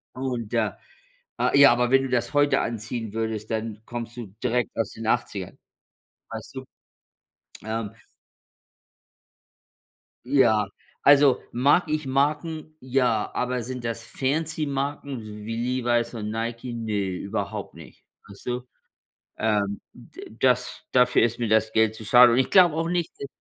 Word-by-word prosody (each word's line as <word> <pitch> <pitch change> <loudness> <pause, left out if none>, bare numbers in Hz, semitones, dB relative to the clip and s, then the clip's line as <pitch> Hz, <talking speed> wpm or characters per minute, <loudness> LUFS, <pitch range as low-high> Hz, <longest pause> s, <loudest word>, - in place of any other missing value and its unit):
Und 125 -4 -4
da 110 -4 0 0.6
äh - - +2
ja, 140 -2 +9
aber 120 0 +1
wenn 135 0 +5
du 135 - -3
das 125 +2 -1
heute 145 0 +3
anziehen 115 0 -4
würdest, 110 -1 -3
dann 110 -1 -3
kommst 120 -1 -6
du 120 -3 -6 0.2
direkt 125 -1 0
aus 110 -3 -1
den 115 - -8
80ern, 105 -5 -2 0.7
weißt - - -8
du? - - -6 1.0
Ähm 110 -1 -3 2.4
Ja, 120 -7 +3 0.4
also, 140 -2 +6
mag 140 +8 +3
ich 155 -2 -2
Marken? 155 +3 -1
Ja, 125 -4 +1
aber 125 0 -1
sind 125 +1 -6
das 115 0 -3
Fancy-Marken 140 -1 -2 0.2
wie 115 +1 -4 0.3
Levi's 120 0 0
und 105 -2 -4
Nike? 115 +2 -4
Ne, 105 -4 -2
überhaupt 95 +2 -4
nicht. - - -14 0.2
Weißt 100 - -14
du? 125 0 -1 0.8
Ähm, 105 -2 0
d 110 - -13
das 125 -1 +1
dafür 125 -1 +4
ist 120 0 +1
mir 120 - -1
das 110 0 +2
Geld 110 -1 +3
zu 110 0 -10
schade. 120 +2 +7
Und 120 - +3
ich 130 - +1
glaube 180 -4 +6
auch 165 +2 -1
nicht, 175 -2 -1
äh, 140 - -4
120 Hz, 145 wpm, -25 LUFS, 110-135 Hz, 2.4 s, ja